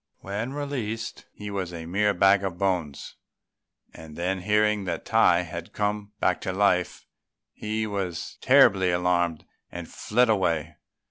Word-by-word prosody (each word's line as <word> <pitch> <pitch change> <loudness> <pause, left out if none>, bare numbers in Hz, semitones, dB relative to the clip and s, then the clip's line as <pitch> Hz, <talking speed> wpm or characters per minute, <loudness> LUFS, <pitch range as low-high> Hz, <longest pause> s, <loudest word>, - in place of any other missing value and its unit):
When 105 +7 -4
released 125 -6 -4
he 105 0 -8
was 95 -3 -3
a 85 -2 -7
mere 100 +4 +1
bag 95 +2 +4
of 95 -3 -3
bones; 90 -7 -2 0.8
and 80 -1 -12
then 90 +2 -2
hearing 105 +1 +1
that 85 -2 -4
Tai 85 0 +4
had 80 - -8
come 105 0 -2
back - - +1
to 95 - -2
life, 95 -2 +1 0.5
he 110 +1 -3
was 95 -5 -4
terribly 95 -1 +5
alarmed 90 -2 0 0.3
and 85 -1 -7
fled 125 +3 +1
away. 85 -7 0
95 Hz, 140 wpm, -26 LUFS, 85-105 Hz, 0.8 s, terribly